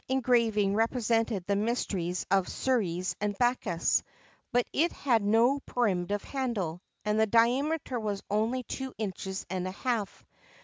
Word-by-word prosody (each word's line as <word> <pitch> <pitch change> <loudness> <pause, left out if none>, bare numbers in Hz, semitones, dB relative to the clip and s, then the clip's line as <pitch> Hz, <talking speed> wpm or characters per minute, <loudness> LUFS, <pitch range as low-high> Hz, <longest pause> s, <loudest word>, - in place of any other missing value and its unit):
] - - -36
engraving 235 -6 +2
represented 225 -3 +1
the 200 - +1
mysteries 200 -5 -1
of 195 -2 +3
Ceres 185 -9 0
and 205 -1 -1
Bacchus; 240 -8 +1 0.5
but 245 0 +2
it 335 +4 +2
had 240 -5 +1
no 230 +7 +3
primitive 205 -6 -1
handle, 210 - -3 0.2
and 210 +1 +1
the 220 - +4
diameter 250 +5 +2
was 205 -3 -3
only 225 +5 0
two 265 +1 -5
inches 190 -2 -4
and 185 0 -3
a - - -3
half. 220 -1 -3
220 Hz, 140 wpm, -29 LUFS, 195-245 Hz, 0.5 s, the